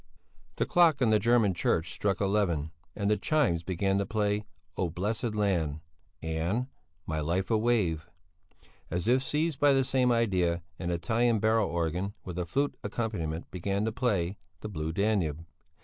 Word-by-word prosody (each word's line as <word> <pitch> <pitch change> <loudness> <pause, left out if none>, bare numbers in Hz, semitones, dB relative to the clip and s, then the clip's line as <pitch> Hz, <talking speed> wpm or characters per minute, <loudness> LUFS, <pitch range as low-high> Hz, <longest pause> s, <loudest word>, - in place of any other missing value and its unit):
The - - 0
clock 170 -6 +4
on 120 -4 +3
the 110 - +5
German 115 -4 +3
church 85 -1 0
struck 100 -2 0
eleven, 95 -7 +1 0.2
and 100 -1 -1
the 105 0 +3
chimes 115 - +1
began 95 +3 0
to 100 - 0
play 105 -1 0 0.3
"Oh 90 - -1
blessed 105 +6 -2
land" 85 -8 0 0.4
and 80 +9 -1 0.4
"My 80 -1 -2
life 85 +7 -1
a 110 - +4
wave"; 105 -9 +1 0.8
as 90 +4 -1
if 125 +2 +4
seized 150 +2 -1
by 145 -1 +5
the 135 0 +3
same 130 -1 +2
idea, 90 -8 +1 0.2
an 85 - -3
Italian 110 +7 +1
barrel 110 0 +2
organ, 85 +4 -2
with 90 -1 -5
a 90 - -2
flute 140 - 0
accompaniment, 100 -7 -3
began 100 +3 -1
to 110 - 0
play 100 -6 -1 0.2
"The 110 - -5
Blue 80 -4 -3
Danube." 85 -5 0
100 Hz, 165 wpm, -29 LUFS, 85-115 Hz, 0.8 s, the